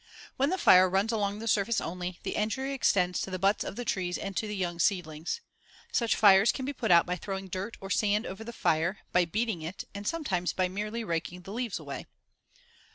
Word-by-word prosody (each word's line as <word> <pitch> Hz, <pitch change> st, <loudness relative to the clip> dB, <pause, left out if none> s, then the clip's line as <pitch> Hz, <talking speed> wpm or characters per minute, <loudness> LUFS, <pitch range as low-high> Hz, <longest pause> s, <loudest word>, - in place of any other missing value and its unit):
When 275 Hz, +2 st, +2 dB
the 375 Hz, -, 0 dB
fire 185 Hz, -, +7 dB
runs 195 Hz, +4 st, +1 dB
along 205 Hz, -2 st, -1 dB
the 225 Hz, +2 st, -6 dB
surface 215 Hz, +1 st, +2 dB
only, 180 Hz, +1 st, -4 dB
the -, -, -2 dB
injury 265 Hz, +6 st, -1 dB
extends 180 Hz, -9 st, +2 dB
to -, -, -3 dB
the 185 Hz, -, -3 dB
butts 195 Hz, +3 st, +2 dB
of -, -, -6 dB
the 245 Hz, -, -5 dB
trees 180 Hz, -4 st, -1 dB
and 195 Hz, -1 st, -5 dB
to 215 Hz, -, -1 dB
the 210 Hz, -, -4 dB
young 175 Hz, -3 st, -2 dB
seedlings. 175 Hz, -, -1 dB, 0.5 s
Such 235 Hz, -2 st, +2 dB
fires 200 Hz, 0 st, +6 dB
can 260 Hz, -, -5 dB
be 285 Hz, -, -3 dB
put 230 Hz, -5 st, -3 dB
out 170 Hz, -1 st, +7 dB
by 180 Hz, -, -1 dB
throwing 190 Hz, +1 st, -5 dB
dirt 190 Hz, +5 st, -4 dB
or 195 Hz, 0 st, -7 dB
sand 210 Hz, +2 st, +2 dB
over 195 Hz, +4 st, -6 dB
the 235 Hz, -, -7 dB
fire, 175 Hz, -2 st, 0 dB
by 180 Hz, 0 st, +4 dB
beating 215 Hz, 0 st, -1 dB
it, 165 Hz, +5 st, -6 dB
and, 200 Hz, 0 st, -6 dB
sometimes, 195 Hz, -, -1 dB
by 185 Hz, -1 st, +1 dB
merely 210 Hz, +4 st, -3 dB
raking 175 Hz, -1 st, -3 dB
the 195 Hz, -, -8 dB
leaves 235 Hz, -2 st, -2 dB
away. -, -, -7 dB
195 Hz, 220 wpm, -29 LUFS, 180-225 Hz, 0.5 s, fire